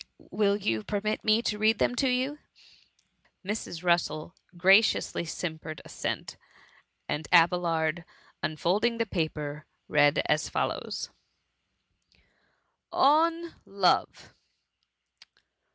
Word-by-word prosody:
Will 200 -1 +2
you 115 - -1
permit 215 +1 -2
me 220 +1 +3
to 210 -2 -2
read 220 +1 +3
them - - +1
to 265 - +2
you 260 +4 -1 0.5
?" - - -38
Mrs. 195 -4 -5
Russel 170 -2 0 0.2
graciously 190 0 +3
simpered 160 -2 -6
assent, - - -5 0.7
and 150 +1 -3
Abelard, 170 -1 +3 0.4
unfolding 190 +10 0
the 230 - 0
paper, 155 -5 -4 0.2
read 145 0 +3
as 155 - 0
follows: - - -3 1.3
— - - -45
ON 330 +4 +3
LOVE. 195 -2 0
180 Hz, 100 wpm, -28 LUFS, 160-220 Hz, 1.3 s, me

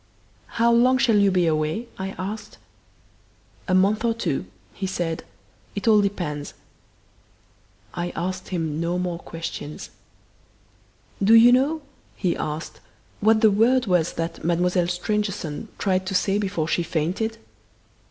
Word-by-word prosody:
"How 235 +1 +4
long 250 +2 +5
shall 235 -4 +3
you 200 -1 +5
be 180 -2 +2
away?" 155 +8 0
I 190 0 -4
asked. 205 +3 -6 1.1
"A 185 - +2
month 200 +4 +3
or 230 -1 +1
two," 155 - -2 0.3
he 190 - -4
said. 170 -3 -3 0.5
"It 200 +2 -4
all 215 -2 +6
depends." 175 -8 -3 1.4
I 175 0 -3
asked 185 +2 -3
him 160 -4 -2
no 170 +1 -1
more 180 -2 -2
questions. 165 -3 -7 1.3
"Do 220 +3 +7
you 235 +2 +8
know," 285 +5 +2 0.3
he 180 - 0
asked, 155 +2 -5 0.4
"what 220 +1 +4
the 220 -2 +6
word 240 +5 +3
was 180 -4 +1
that 165 0 -4
Mademoiselle 175 +1 +1
Stangerson 195 -1 -2
tried 185 -1 0
to 190 - -2
say 195 +2 +2
before 190 -6 -1
she 175 - +1
fainted?" 175 +8 -2
185 Hz, 135 wpm, -24 LUFS, 170-215 Hz, 1.4 s, you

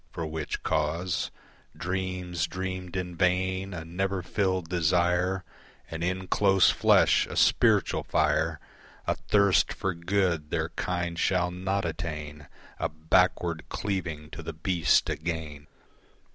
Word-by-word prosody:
For 85 -2 -4
which 80 -1 -4
cause, 80 +3 0 0.5
Dreams 90 -1 -2
dreamed 95 0 -5
in 90 -1 -3
vain, 95 +2 +1
a 85 -3 -6
never 95 +2 -2
filled 95 -2 0
desire 90 +2 +1 0.5
And 80 +1 -4
in 95 +1 -1
close 95 -1 +4
flesh - - +4
a - - -7
spiritual - - +3
fire, - - +1 0.5
A - - +2
thirst 100 -2 +3
for 95 - -2
good 85 -3 0
their - - -1
kind 85 -2 -3
shall 90 -1 +1
not 95 +2 -2
attain, 75 -3 -5 0.3
A - - 0
backward 85 +1 +1
cleaving 85 -7 -3
to - - -7
the 80 - -6
beast 85 +1 +2
again. 75 -3 -4
90 Hz, 125 wpm, -28 LUFS, 80-95 Hz, 0.5 s, close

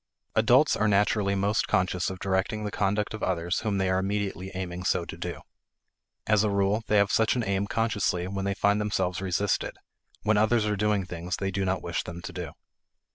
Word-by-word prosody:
Adults - - +4
are 110 - +1
naturally 100 0 +2
most 100 +2 +1
conscious 90 -1 +1
of 95 - -6
directing 95 +3 -1
the 105 - -3
conduct 105 +2 0
of 110 - -6
others 90 +2 -1
when 105 -3 0
they 95 -1 +1
are 95 0 +2
immediately 95 -1 -2
aiming 90 -1 -4
so 90 -1 +1
to - - -7
do. - - -5 0.8
As 105 -1 +3
a 105 - +2
rule, 100 +2 +1
they 105 - +3
have 100 0 +3
such 110 +2 +3
an 120 - 0
aim 100 0 0
consciously 105 -5 0
when 95 0 -3
they 100 0 0
find 100 +2 +2
themselves 95 -3 -1
resisted; 95 +2 -1 0.5
when 105 0 +3
others 110 +1 +3
are 105 0 0
doing 105 -1 +1
things 85 +1 -4
they 95 -1 -2
do 95 +1 -1
not 95 0 -1
wish 85 0 -2
them 85 0 -8
to 95 - -7
do. 90 -2 -6
100 Hz, 205 wpm, -27 LUFS, 95-105 Hz, 0.8 s, Adults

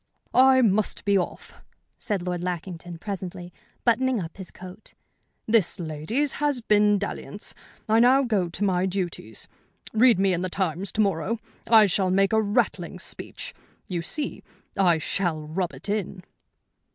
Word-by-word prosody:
"I 260 0 +6
must 210 -1 +1
be 200 0 +3
off," 185 - -3 0.4
said 200 -5 -2
Lord 180 -1 -2
Lackington, 175 -1 -5
presently, 180 -2 -6 0.3
buttoning 250 +1 +2
up 165 -3 -7
his 190 -2 -4
coat. 185 +3 -10 0.5
"This, 220 -4 +2
ladies, 170 - -1
has 290 -3 +1
been 210 -2 +4
dalliance. 205 +1 -4 0.3
I 220 +1 +4
now 255 +3 +5
go 205 -8 0
to 175 - -4
my 185 -2 +2
duties. 175 - -4 0.5
Read 230 -1 +6
me 195 0 +2
in 175 - -1
the 185 - -2
Times 185 0 -2
to 220 - +2
morrow. 200 +3 0 0.3
I 220 -2 +8
shall 190 -1 +1
make 195 +2 +2
a 220 - +4
rattling 205 -1 0
speech. - - -6 0.4
You 175 -3 -2
see, 290 - -4 0.3
I 180 -4 +4
shall 165 0 -1
rub 175 +3 -2
it 135 +6 -9
in." 200 -3 -3
195 Hz, 150 wpm, -25 LUFS, 175-220 Hz, 0.5 s, I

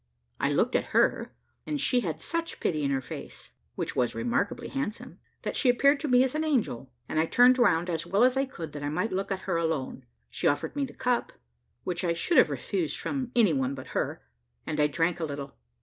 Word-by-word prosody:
I 140 - +1
looked 230 - +1
at - - -1
her, - - +2 0.3
and 300 -1 -1
she 250 - +3
had 160 -9 -3
such 335 - -3
pity 155 -3 0
in 140 - 0
her 135 -1 0
face, 125 - -9 0.2
which - - -3
was 125 -2 0
remarkably 235 +1 -1
handsome, 270 -6 -5 0.2
that - - -3
she 260 - +3
appeared 280 +4 +4
to 305 - -3
me 250 -1 +5
as 260 - -1
an 310 +1 0
angel, 220 - -1 0.2
and 155 - -1
I 160 - +2
turned 250 +5 +5
round 175 -8 +3
as 165 -1 -2
well 195 +6 +3
as 255 +1 +4
I 270 +1 +2
could, 165 - -8
that 145 - -7
I 145 - -2
might 180 +9 -1
look 195 +1 -2
at 190 -1 -2
her 180 -3 -1
alone. 150 -6 -2 0.2
She - - -1
offered 145 - 0
me 285 -1 0
the 260 - -11
cup, 250 -2 0 0.5
which 175 -1 -2
I 170 -2 +1
should 170 - +3
have - - +5
refused 345 -4 -2
from 260 -3 -3
any 220 -9 +5
one 135 -1 0
but 130 - -9
her, - - -2 0.4
and 155 - -3
I 150 - +5
drank 165 +3 0
a - - -3
little. 140 -2 -6
185 Hz, 230 wpm, -28 LUFS, 150-255 Hz, 0.5 s, me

